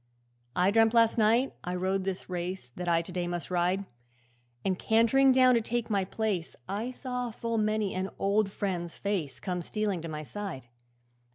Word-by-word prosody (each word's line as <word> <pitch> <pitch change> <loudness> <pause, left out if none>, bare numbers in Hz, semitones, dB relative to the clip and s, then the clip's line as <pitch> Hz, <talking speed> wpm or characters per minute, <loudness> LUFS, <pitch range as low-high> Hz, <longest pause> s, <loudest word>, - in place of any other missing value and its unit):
'I 180 +2 +3
dreamt 225 +1 +4
last 230 0 +4
night 230 +5 +3
I 180 +1 -3
rode 190 +1 0
this 190 -1 -3
race 180 -5 -4
That 180 -1 -3
I 165 0 +3
to 180 - -8
day 175 -1 -2
must 175 +1 -4
ride, 180 +2 +1 0.8
And 185 -1 0
cant'ring 230 +5 +4
down 255 -1 +6
to 235 - +3
take 235 0 -2
my 195 -2 +2
place 195 -4 -2
I 210 +5 -2
saw 250 -1 -4
full 230 0 -2
many 215 -1 +1
an 185 +1 -2
old 200 +1 +2
friend's 175 -4 -3
face 185 -9 -2
Come 180 -2 -3
stealing 205 -1 -2
to 165 - -6
my 155 0 -5
side. 190 -6 -6
195 Hz, 180 wpm, -29 LUFS, 180-225 Hz, 0.8 s, down